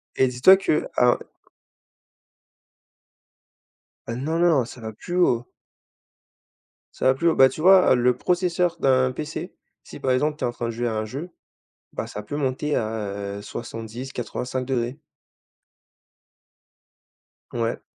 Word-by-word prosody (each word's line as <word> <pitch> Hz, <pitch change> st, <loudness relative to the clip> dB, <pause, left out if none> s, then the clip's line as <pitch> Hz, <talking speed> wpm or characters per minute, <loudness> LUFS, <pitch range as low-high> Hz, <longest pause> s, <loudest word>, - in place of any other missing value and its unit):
Et 130 Hz, -, +3 dB
dis-toi 125 Hz, +10 st, +6 dB
que 175 Hz, -5 st, 0 dB
un 125 Hz, 0 st, +5 dB, 2.9 s
Heu, 115 Hz, -, -3 dB
non, 155 Hz, +5 st, -2 dB
non, 165 Hz, -7 st, +4 dB
ça 125 Hz, -, -11 dB
va 110 Hz, 0 st, -5 dB
plus 175 Hz, +11 st, -7 dB
haut 125 Hz, -9 st, +3 dB, 1.5 s
ça -, -, -4 dB
va 130 Hz, 0 st, +5 dB
plus 170 Hz, +5 st, 0 dB
haut. -, -, +1 dB
Bah 130 Hz, 0 st, +7 dB
tu -, -, -9 dB
vois? 185 Hz, -6 st, +6 dB
le 125 Hz, 0 st, +2 dB
processeur 175 Hz, +1 st, 0 dB
d'un 130 Hz, -1 st, +3 dB
PC, 150 Hz, +4 st, -6 dB, 0.3 s
si -, -, -11 dB
par 130 Hz, -, 0 dB
exemple, 150 Hz, +4 st, +1 dB
tu -, -, -6 dB
es -, -, +1 dB
en -, -, -2 dB
train 120 Hz, -1 st, -4 dB
de -, -, -2 dB
jouer 120 Hz, +1 st, -2 dB
à 115 Hz, -, -2 dB
un 110 Hz, 0 st, -2 dB
jeu, 145 Hz, +10 st, -7 dB, 0.6 s
bah, -, -, -4 dB
ça 105 Hz, -, -7 dB
peut 145 Hz, -, -6 dB
monter 145 Hz, +2 st, -1 dB
à, 100 Hz, -2 st, -3 dB
heu, -, -, -7 dB
70-85º 125 Hz, +3 st, -5 dB
degrés. 125 Hz, +1 st, -2 dB, 2.5 s
Ouais. 115 Hz, -1 st, -2 dB
130 Hz, 145 wpm, -24 LUFS, 115-150 Hz, 2.9 s, Bah